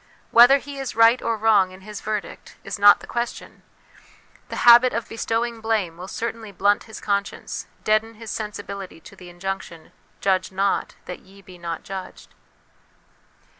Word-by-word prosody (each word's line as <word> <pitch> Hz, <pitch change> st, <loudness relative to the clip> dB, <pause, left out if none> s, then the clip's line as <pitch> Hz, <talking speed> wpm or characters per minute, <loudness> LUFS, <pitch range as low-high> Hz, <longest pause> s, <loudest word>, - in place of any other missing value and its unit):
Whether 245 Hz, +4 st, +8 dB
he 280 Hz, 0 st, -9 dB
is 270 Hz, -5 st, -5 dB
right 230 Hz, +2 st, +5 dB
or 230 Hz, -1 st, -1 dB
wrong 210 Hz, -3 st, +4 dB
in 185 Hz, +1 st, -14 dB
his 210 Hz, +1 st, -8 dB
verdict, 215 Hz, -1 st, -5 dB
is -, -, -6 dB
not 205 Hz, 0 st, +7 dB
the -, -, -10 dB
question; 235 Hz, 0 st, -5 dB, 0.9 s
the -, -, -5 dB
habit 240 Hz, +1 st, +8 dB
of 230 Hz, 0 st, -3 dB
bestowing 230 Hz, +1 st, -2 dB
blame 215 Hz, -7 st, -1 dB
will 180 Hz, +2 st, -9 dB
certainly 225 Hz, 0 st, -5 dB
blunt 200 Hz, +2 st, +1 dB
his 220 Hz, -, -10 dB
conscience, 200 Hz, -1 st, -3 dB, 0.2 s
deaden 215 Hz, +1 st, +1 dB
his 220 Hz, 0 st, -8 dB
sensibility 200 Hz, -5 st, -6 dB
to -, -, -14 dB
the 180 Hz, -1 st, -12 dB
injunction, 175 Hz, -2 st, -6 dB
" -, -, -37 dB
Judge 190 Hz, -1 st, 0 dB
not, 195 Hz, +1 st, -1 dB
that 180 Hz, -, -7 dB
ye 195 Hz, +1 st, -19 dB
be 180 Hz, -1 st, -14 dB
not 170 Hz, -1 st, -5 dB
judged." 190 Hz, -1 st, -9 dB
205 Hz, 165 wpm, -23 LUFS, 190-230 Hz, 0.9 s, Whether